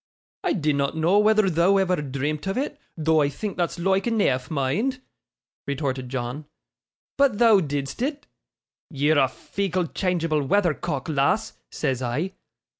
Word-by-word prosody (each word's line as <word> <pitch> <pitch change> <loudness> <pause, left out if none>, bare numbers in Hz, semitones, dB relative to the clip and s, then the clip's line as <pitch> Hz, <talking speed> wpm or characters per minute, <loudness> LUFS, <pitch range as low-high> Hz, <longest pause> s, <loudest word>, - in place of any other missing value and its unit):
'I 365 - +2
dinnot 150 -4 0
know 170 +6 +3
whether 215 -1 +4
thou'd 185 +3 +3
ever 180 -4 +1
dreamt 145 +4 -3
of 195 - -1
it, 290 +2 -3 0.2
though 160 0 +3
I 140 - +2
think 205 +7 -5
that's 175 -1 -1
loike 190 +2 +1
eneaf, 145 - +1
mind,' 160 - -1 0.7
retorted 135 -2 -2
John; 130 +3 -4 0.7
'but 275 -7 +4
thou 225 -3 +6
didst 145 +2 -3
it. 290 +2 -2 0.6
"Ye're 145 +1 +2
a 135 - +4
feeckle, 180 +4 -3
changeable 165 -5 0
weathercock, 160 -3 0
lass," 140 -3 +1 0.2
says 130 -1 -2
I. 145 +10 -2
160 Hz, 140 wpm, -24 LUFS, 140-195 Hz, 0.7 s, thou